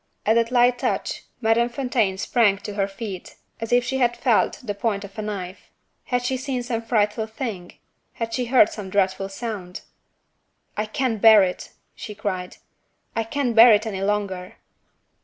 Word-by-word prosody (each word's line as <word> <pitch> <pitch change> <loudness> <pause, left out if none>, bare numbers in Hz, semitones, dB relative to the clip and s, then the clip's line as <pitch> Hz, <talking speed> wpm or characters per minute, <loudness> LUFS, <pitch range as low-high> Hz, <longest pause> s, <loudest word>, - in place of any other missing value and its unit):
At 220 - +4
that 230 0 +2
light 245 0 +3
touch, 255 - -2 0.2
Madame 230 +1 +2
Fontaine 235 -6 0
sprang 205 -1 +2
to 205 +1 -7
her 200 -1 0
feet 195 -2 -8 0.2
as 225 0 -5
if 245 0 +4
she 265 +2 -2
had 240 -1 +2
felt 240 -5 +2
the 210 -4 -3
point 200 -1 -2
of 200 0 -11
a - - -1
knife. 195 -3 -6 0.4
Had 245 -1 -1
she 260 +1 0
seen 260 -1 -3
some 235 -2 -2
frightful 220 -1 0
thing? 220 -6 -6 0.4
had 230 -1 -4
she 250 - -1
heard 240 -3 +5
some 205 -3 -7
dreadful 195 0 0
sound? 195 -4 -6 0.9
"I 210 +1 -2
can't 225 -1 -2
bear 220 -3 +8
it!" 180 -1 -4 0.2
she 210 - -8
cried 185 -3 -4 0.6
"I 225 - 0
can't 245 0 -2
bear 230 +1 +9
it 210 +2 +2
any 195 -4 -4
longer!" 195 -2 -2
220 Hz, 175 wpm, -23 LUFS, 200-240 Hz, 0.9 s, bear